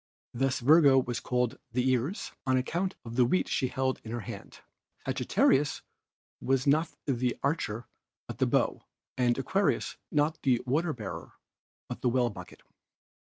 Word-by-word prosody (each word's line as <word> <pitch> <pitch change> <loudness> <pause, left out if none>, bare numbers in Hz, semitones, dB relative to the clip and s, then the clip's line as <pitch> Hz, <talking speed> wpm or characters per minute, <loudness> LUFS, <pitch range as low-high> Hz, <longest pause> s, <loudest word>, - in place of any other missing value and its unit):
Thus 130 +1 0
Virgo 140 0 +6
was 125 -2 0
called 125 +1 -1
the 125 +1 +1
Ears, 130 - -1 0.2
on 130 0 +3
account 175 +9 -1
of 115 0 -7
the 125 - +6
wheat 180 +10 +2
she 130 - 0
held 130 +1 -1
in 110 - -9
her 120 0 -3
hand; 105 -3 -9 0.4
Sagittarius 145 +2 +2 0.6
was 135 -1 +1
not 155 +2 +2
the 125 -3 0
Archer 125 -6 -1 0.4
but - - -7
the - - +3
Bow, - - +1 0.3
and 125 -2 +2
Aquarius 195 +9 0
not 150 +1 +1
the 125 -4 +3
Water 155 +6 +1
bearer 95 -8 -7 0.5
but - - -7
the 125 - +2
Well 120 -1 +1
Bucket. 90 -3 -11
130 Hz, 155 wpm, -29 LUFS, 120-145 Hz, 0.6 s, Virgo